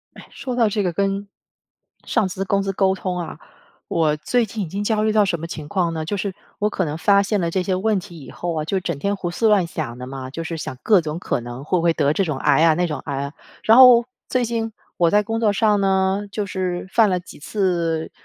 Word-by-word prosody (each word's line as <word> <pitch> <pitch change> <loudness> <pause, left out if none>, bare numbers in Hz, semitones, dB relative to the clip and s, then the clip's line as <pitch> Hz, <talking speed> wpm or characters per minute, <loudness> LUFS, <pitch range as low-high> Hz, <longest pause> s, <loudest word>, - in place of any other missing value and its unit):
唉， - - -12
说 260 -3 -5
到 230 -3 +4
这 205 0 -1
个 180 -3 0
跟 195 +2 -1 0.8
上 215 -5 +1
司、 190 +1 -4
公 195 +1 +1
司 195 0 -2
沟 190 0 +2
通 185 -1 -3
啊， 170 -2 -6 0.5
我 155 -2 +1
最 235 +9 0
近 210 0 -4
已 165 - -7
经 200 +4 -3
焦 215 0 +1
虑 215 0 +2
到 210 -1 +4
什 175 -3 -1
么 165 - -5
情 155 -3 -7
况 175 -3 0
呢？ 160 -1 -3
就 205 +5 -2
是 195 -1 -3 0.2
我 210 +1 +1
可 190 - -1
能 150 0 -3
发 200 +4 +4
现 205 0 0
了 170 -1 0
这 185 +2 0
些 185 0 -1
问 205 +2 +1
题 175 -4 -12
以 135 - -11
后 175 -1 -4
啊， - - -3
就 190 +4 -1
整 170 -5 -3
天 200 +6 0
胡 175 -2 -3
思 220 +5 +1
乱 200 -5 +4
想 140 -7 -5
的 125 - -7
嘛， 130 -1 -7
就 165 +4 -5
是 165 0 -4
想 140 - -6
各 205 -4 +5
种 155 0 -4
可 175 - -2
能 120 +3 -8
会 180 +4 +1
不 - - -1
会 170 -1 +4
得 145 -2 +1
这 195 - +1
种 155 -5 -3
癌 145 +2 +3
啊、 160 -2 +5
那 175 +2 +1
种 150 - -4
癌 140 -2 -3
啊， 140 - -6 0.3
然 225 - +5
后 250 -2 +9 0.2
最 255 -1 +1
近 225 -1 -2 0.2
我 170 -2 +3
在 210 0 +4
工 225 +2 -3
作 215 -3 +3
上 210 -1 +2
呢， 190 +1 +1
就 205 +1 -3
是 185 -1 -3
犯 220 -2 +4
了 180 - 0
几 175 - -13
次 170 -2 -1
185 Hz, 280 characters per minute, -21 LUFS, 165-205 Hz, 0.8 s, 后